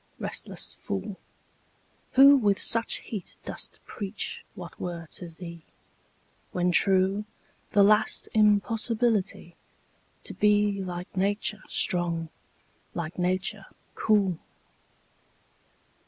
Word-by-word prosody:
Restless - - -4
fool, 100 - -4 0.9
Who 275 +2 +9
with 205 -7 +3
such 230 0 +3
heat 205 -5 -7
dost - - -6
preach 205 -1 -5
what 175 -2 -10
were 170 -2 -5
to 175 - -8
thee, 170 0 -10 0.9
When 180 0 +1
true, 190 +3 +3 0.5
the 200 - +6
last 210 +2 +3
impossibility 215 -2 +1 0.7
To - - -7
be 205 -1 +2
like 180 0 -6
Nature 205 +2 0
strong, 170 -2 0 0.7
like 170 +1 -4
Nature 185 +3 -1 0.3
cool! 200 -6 +2
195 Hz, 95 wpm, -27 LUFS, 175-210 Hz, 0.9 s, Who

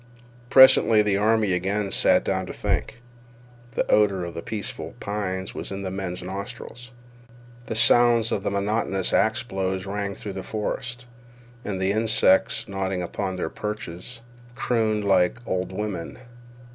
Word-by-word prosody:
Presently 130 -5 +7
the 100 -2 +1
army 105 -1 +2
again 100 +3 -1
sat - - +4
down - - -1
to - - -6
think. 120 - -2 0.7
The - - 0
odor 100 -4 +3
of 85 - -7
the 85 - -5
peaceful 105 +1 -5
pines 95 -2 -3
was - - -6
in 100 0 -5
the 95 - -4
men's 95 -2 -5
nostrils. 105 +6 -7 0.8
The 115 - -3
sound 115 0 +4
of 100 - -1
monotonous 100 -1 -1
axe 110 +4 +2
blows 95 -4 -3
rang 100 0 -3
through 100 - -6
the 95 - -5
forest, 120 +4 -4 0.6
and 100 -2 -4
the 95 +1 +1
insects, 110 -3 +3
nodding 95 -2 -2
upon 95 +2 -3
their 90 -3 -3
perches, 105 +2 -6 0.3
crooned 110 -4 0
like 95 0 +3
old 95 0 -2
women. 95 -4 -5
100 Hz, 145 wpm, -24 LUFS, 95-110 Hz, 0.8 s, Presently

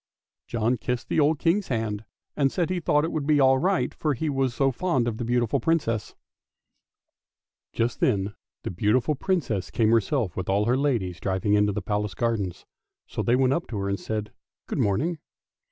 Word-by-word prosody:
John 120 +2 0
kissed 120 +2 -3
the - - +1
old 150 +1 +3
King's 175 +7 +1
hand 110 -3 -2 0.3
and 140 -2 +2
said 175 -1 -1
he 185 - 0
thought 150 -2 +2
it 165 - -1
would 150 -3 -2
be 150 -1 +4
all 130 -1 +5
right 190 +4 +1
for 150 -3 -1
he 150 +4 -1
was 135 -2 +1
so 135 -1 +2
fond 130 -5 0
of 115 -2 -2
the 120 - -3
beautiful 120 +2 +1
Princess. 115 -6 0 1.6
Just 115 +1 -1
then 100 -4 +1 0.3
the 110 - +1
Princess 130 - -1
came 110 -1 +2
herself 115 - +1
with 95 0 -4
all 100 +2 +2
her 120 +3 +3
ladies 120 -11 0
driving 95 +1 0
into 105 0 +4
the 100 -1 -4
Palace 105 +1 -2
gardens, 110 -7 -2 0.4
so - - -4
they 120 - +2
went 130 0 +3
up 170 - -2
to 110 - -5
her 100 0 -2
and 100 0 -1
said 105 -1 -4 0.2
" - - -68
Good - - -3
morning." 150 - +1
120 Hz, 190 wpm, -26 LUFS, 105-145 Hz, 1.6 s, all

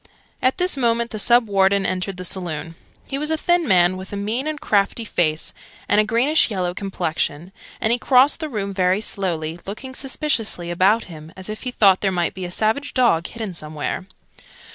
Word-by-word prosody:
At 255 - +2
this 360 -4 +2
moment 235 -2 +1
the 215 - -4
Sub 240 +2 +5
Warden 195 0 +2
entered 185 0 -2
the 185 - -6
saloon. 165 -3 -3 0.3
He 275 - -4
was 300 +1 -1
a 320 - +1
thin 345 0 +1
man, 185 -2 +4
with 190 0 -9
a - - -4
mean 225 +8 -2
and 310 -1 -3
crafty 210 -2 0
face, 155 -6 0 0.3
and 210 - +4
a - - +1
greenish 245 +9 +3
yellow 180 -4 -2
complexion; 175 -3 -3 0.3
and 220 - +1
he 245 - +1
crossed 265 +5 +4
the 310 -2 -4
room 200 -5 -3
very 185 0 +2
slowly, 170 -6 -3
looking 260 +6 -7
suspiciously 255 - -1
about 195 +6 +3
him 160 -2 -11
as 190 +2 -6
if 215 - -6
he 255 - -3
thought 195 -6 +4
there 195 - +1
might 175 -2 -1
be 185 -1 -6
a - - -5
savage 220 +9 0
dog 230 -10 +3
hidden 220 -5 -6
somewhere. 155 +3 -4
200 Hz, 195 wpm, -21 LUFS, 180-240 Hz, 0.3 s, Sub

